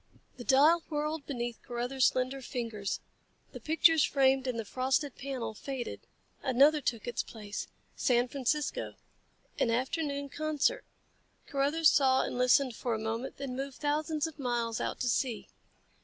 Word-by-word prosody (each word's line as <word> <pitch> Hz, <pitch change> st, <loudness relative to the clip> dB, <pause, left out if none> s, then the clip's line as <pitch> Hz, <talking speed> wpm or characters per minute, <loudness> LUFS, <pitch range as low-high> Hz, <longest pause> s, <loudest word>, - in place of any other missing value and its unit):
The 245 Hz, -, -7 dB
dial 295 Hz, +7 st, +5 dB
whirled 300 Hz, -1 st, -2 dB
beneath 240 Hz, -4 st, -4 dB
Carruthers 245 Hz, +2 st, 0 dB
slender 255 Hz, +1 st, -1 dB
fingers. 230 Hz, -5 st, -4 dB, 0.5 s
The -, -, -8 dB
pictures 320 Hz, 0 st, +4 dB
framed 265 Hz, -1 st, +3 dB
in 250 Hz, -2 st, -1 dB
the 225 Hz, -, -3 dB
frosted 265 Hz, +4 st, 0 dB
panel 255 Hz, -5 st, -4 dB
faded. 255 Hz, +2 st, -6 dB, 0.3 s
Another 285 Hz, +4 st, +4 dB
took 235 Hz, -4 st, -2 dB
its 240 Hz, -, -1 dB
place. 210 Hz, -2 st, -7 dB, 0.3 s
San 245 Hz, 0 st, +2 dB
Francisco 280 Hz, +3 st, -2 dB, 0.6 s
an -, -, +2 dB
afternoon 280 Hz, +4 st, -1 dB
concert. 310 Hz, -, 0 dB, 0.6 s
Carruthers 290 Hz, +3 st, +3 dB
saw 265 Hz, -2 st, +4 dB
and -, -, -4 dB
listened 250 Hz, 0 st, +3 dB
for 235 Hz, -1 st, -2 dB
a -, -, -3 dB
moment, 225 Hz, +3 st, -4 dB
then 270 Hz, -2 st, -5 dB
moved 270 Hz, 0 st, -5 dB
thousands 305 Hz, +1 st, 0 dB
of 320 Hz, -2 st, -7 dB
miles 240 Hz, -3 st, -1 dB
out -, -, -3 dB
to 250 Hz, -, 0 dB
sea. 245 Hz, -1 st, -1 dB
265 Hz, 145 wpm, -31 LUFS, 240-290 Hz, 0.6 s, dial